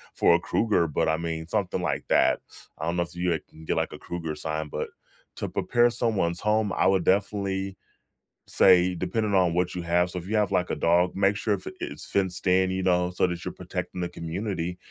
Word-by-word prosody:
for 85 - +5
a - - +2
cougar, 100 -7 +1
but - - +1
I 80 - +2
mean, 80 -1 -4
something 95 -2 -1
like 85 - -2
that. - - +3 0.4
I 80 - -4
don't 85 +1 -1
know 85 - +2
if 85 +1 -12
you 90 -3 0
can 80 0 -15
get - - -1
like - - -1
a - - -9
cougar 80 -3 -5
sign, 80 0 -3
but - - -4 0.5
to - - -3
prepare 120 0 +2
someone's 105 -8 -1
home, 105 -2 +1
I - - +1
would 95 -2 +2
definitely, 95 -1 0 0.7
say 90 -1 +5
depending 100 +4 -1
on 90 -3 +3
what 90 0 0
you 90 - -3
have 85 +1 +2
so, 90 - -4
if 90 - -10
you 110 - -1
have 105 -1 +1
like 90 -1 +1
a - - 0
dog, 90 +2 +2
make 100 +1 +3
sure - - +1
if - - -11
i - - -4
it's 350 - -6
fenced 95 -2 -1
in, 95 0 +4
you 95 0 -2
know, 90 -1 +2
so 90 - +1
that 85 -1 -4
you're - - -3
protecting 90 - -5
the 85 - -2
community, 90 +1 -4
90 Hz, 225 wpm, -26 LUFS, 85-100 Hz, 0.7 s, for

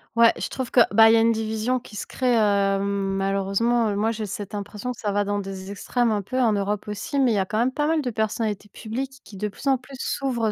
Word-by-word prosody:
Ouais, 230 0 +6
je - - -3
trouve 260 -2 -4
que - - +4
bah, 225 +1 +8
il - - +5
y 230 - +6
a - - +4
une 230 +1 +4
division 220 +3 -1
qui 225 -3 -14
se - - -5
crée, 250 -2 +1
heu, 200 -2 +2
malheureusement. 200 +3 0
Moi, 215 +3 +1
j'ai 220 -1 -4
cette 205 0 -6
impression 205 +4 -5
que 245 - -9
ça 205 - -1
va 205 +1 +1
dans 205 0 -1
des 195 -1 -6
extrêmes 235 +4 0
un 210 -1 0
peu 255 +7 -3
en 230 -3 +3
Europe 205 +1 -2
aussi 210 +9 -3
mais 260 -3 +4
il - - +1
y - - +1
a 190 - +1
quand 215 +3 -2
même 250 +3 +2
pas 295 +1 0
mal 320 -1 +2
de 255 - -2
personnalités 215 -2 -2
publiques 265 +5 -6
qui, 200 - -12
de 210 +2 -1
plus 210 +7 -8
en 270 -1 +4
plus, 265 +2 -13
s'ouvrent 240 -7 -1
220 Hz, 270 wpm, -24 LUFS, 200-240 Hz, -, bah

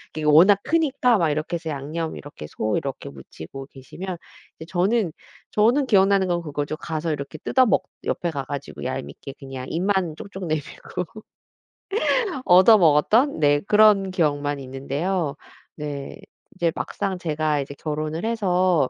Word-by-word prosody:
이게 155 - -4
워낙 180 +7 +6
크니까 280 -7 +2
막 165 -4 +2
이렇게 155 +3 -2
해서 165 -1 -4
양념 155 +4 -4
이렇게 145 - -10
소 110 +5 -2
이렇게 135 - -5
무치고 80 - -10
계시면 175 +7 -7 0.4
이제 160 - -8
저는, 190 +1 +1 0.4
저는 245 +6 +3
기억나는 195 -2 +4
건 175 -1 0
그거죠. 145 0 -3
가서 160 0 -3
이렇게 140 +1 -6
뜯어 260 - +3
먹 210 - +2 0.2
옆에 175 - -1
가 140 -3 -3
가지고 140 +1 -7
얄밉게 130 +1 -5
그냥 135 -2 -7
입만 180 -2 0
쪽쪽 190 -2 -7
내밀고 155 +3 -4 1.4
얻어 190 +5 +7
먹었던 175 - +4
네 145 -1 +4
그런 210 -2 +5
기억만 145 -5 0
있는데요. 140 +5 -2 0.4
네. 145 -2 -6 0.4
이제 170 -3 +1
막상 195 -3 -3
제가 155 -3 0
이제 140 +1 -5
결혼을 155 +4 -3
해서 185 - +2
160 Hz, 310 characters per minute, -23 LUFS, 145-190 Hz, 1.4 s, 얻어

